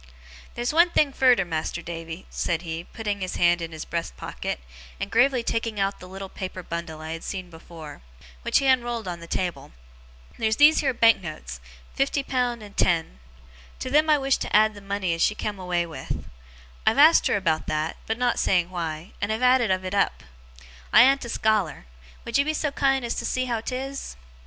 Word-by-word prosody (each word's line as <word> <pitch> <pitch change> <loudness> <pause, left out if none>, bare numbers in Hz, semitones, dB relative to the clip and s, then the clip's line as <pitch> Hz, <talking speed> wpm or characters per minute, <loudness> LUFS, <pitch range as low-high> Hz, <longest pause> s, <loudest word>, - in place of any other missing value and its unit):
'Theer's 240 +3 -1
one 340 +2 +5
thing 300 -4 +2
furder, 250 -8 +4
Mas'r 165 +1 -3
Davy,' 165 +1 -7
said 170 0 -1
he, 165 0 -5
putting 205 -3 -4
his 185 - -3
hand 175 0 +3
in 165 0 -5
his 160 -1 -7
breast 170 -1 -4
pocket, - - -4 0.4
and 200 - -4
gravely 250 +1 +3
taking 230 -2 -2
out 195 0 0
the 180 - -10
little 195 +1 -7
paper 185 -1 -6
bundle 165 -2 -5
I 160 0 -6
had 165 0 -6
seen 185 -3 -5
before, 160 - -11 0.4
which - - +2
he 275 - +1
unrolled 240 -4 +1
on 175 -1 -4
the 170 - -10
table. 175 - -3 0.7
'Theer's 220 -1 +1
these 300 +4 +6
here 275 -3 +2
banknotes 170 - +1 0.3
fifty 275 +1 0
pound, 245 -4 -1
and 205 -1 -12
ten. 165 - +1 0.6
To 255 - -5
them 305 +2 +4
I 300 - +6
wish 270 -1 +1
to - - -2
add 215 +1 +5
the 205 - -11
money 195 -3 -1
as 165 - -3
she 210 - +3
come 205 -2 -4
away 180 -2 -1
with. 165 -2 -6 0.6
I've 225 - +4
asked 310 +3 +7
her - - +2
about 160 -5 0
that 155 +1 -1
(but 225 - -1
not 245 -1 +1
saying 180 -1 +2
why), 165 -1 -4
and 205 +1 0
have 220 +3 -2
added 250 -3 +4
of 185 0 0
it 185 - -4
up. 200 - +1 0.7
I - - +9
an't 270 0 +3
a - - -6
scholar. 215 - 0 0.4
Would 235 +4 +1
you 280 - +3
be 310 +1 -1
so 300 -1 -1
kind 270 -2 +1
as 235 - -1
see 255 0 -1
how 235 -3 -2
'tis? 270 - -5
205 Hz, 200 wpm, -25 LUFS, 170-250 Hz, 0.7 s, I